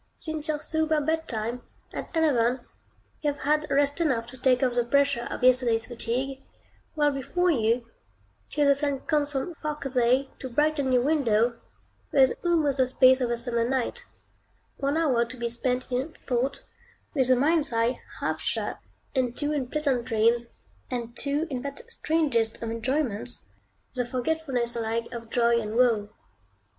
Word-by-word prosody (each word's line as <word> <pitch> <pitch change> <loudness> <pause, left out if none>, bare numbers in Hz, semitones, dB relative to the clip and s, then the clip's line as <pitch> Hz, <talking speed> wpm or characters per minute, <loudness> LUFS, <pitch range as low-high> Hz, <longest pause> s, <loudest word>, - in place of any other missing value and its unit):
Since 315 -1 -2
your 305 -1 0
sober 315 0 0
bedtime, 250 -7 -2 0.3
at - - -5
eleven, 255 -6 +2 0.6
you 295 - +1
have 285 - -10
had 305 +1 +1
rest 285 +3 +2
enough 260 -8 +1
to 260 - -12
take 255 0 +3
off 250 -2 +2
the 240 0 +2
pressure 275 -1 +2
of - - -5
yesterday's 245 -3 +4
fatigue; 255 +3 -2 0.5
while 295 -1 +3
before 350 +7 0
you, 230 -3 +1 0.6
till 295 - +1
the 280 - +6
sun 280 -1 -1
comes 295 -1 0
from 270 +6 -2
"far 305 -2 -4
Cathay" 260 -1 +1
to 260 - -6
brighten 290 +1 +1
your 250 -1 +4
window, 235 -6 +2 0.5
there 275 - +5
is 260 - +3
almost 310 -6 +2
the 260 - +4
space 260 0 +5
of 245 - +1
a 235 - 0
summer 235 -1 +2
night; 265 - -1 0.7
one 280 +2 0
hour 265 -8 +3
to 245 +2 -8
be 235 0 -2
spent 250 +2 -1
in 265 +6 -2
thought, 255 +2 -2 0.5
with 265 -5 +2
the 255 - +5
mind's 300 +3 +2
eye 230 +2 0 0.2
half - - -1
shut, - - -2 0.3
and 250 -3 0
two 295 0 0
in 280 -4 -1
pleasant 275 -4 0
dreams, 230 +2 +2 0.4
and 235 -1 -4
two 285 +5 0
in 255 -2 -2
that 280 +1 -6
strangest 275 - 0
of 225 - -3
enjoyments, 230 - -2 0.5
the 250 -1 0
forgetfulness 250 -1 -1
alike 230 0 -1
of 230 -1 -7
joy 235 0 +3
and 215 0 -5
woe. 230 -4 +3
260 Hz, 165 wpm, -27 LUFS, 235-290 Hz, 0.7 s, the